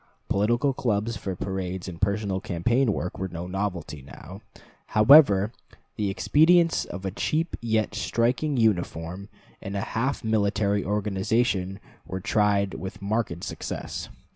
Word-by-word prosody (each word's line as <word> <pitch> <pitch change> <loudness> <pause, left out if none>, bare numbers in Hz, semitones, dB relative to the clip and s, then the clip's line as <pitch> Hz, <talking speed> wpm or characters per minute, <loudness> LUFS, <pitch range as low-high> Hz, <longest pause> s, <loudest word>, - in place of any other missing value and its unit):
Political 120 +7 +2
clubs, 115 -2 -1
for 95 -2 -4
parades 95 0 -4
and 85 -2 -8
personal 100 -1 0
campaign 115 +9 +1
work, 90 -2 -4
were 95 - -2
no 85 -1 -6
novelty; 90 -5 -4
now, 90 +8 -11 0.6
however, 105 -4 +7 0.4
the 105 -2 -1
expedients 165 - +3
of 95 +2 -7
a 95 - -1
cheap 160 - -1
yet 110 -2 0
striking 120 +6 0
uniform 95 -3 -1 0.3
and 100 +1 -6
a - - -1
half 130 +5 -1
military 105 -2 +1
organization 100 -1 0 0.3
were 95 +2 -4
tried 100 0 +1
with 95 - -7
marked 100 -4 -2
success. - - -5
100 Hz, 130 wpm, -26 LUFS, 95-115 Hz, 0.6 s, however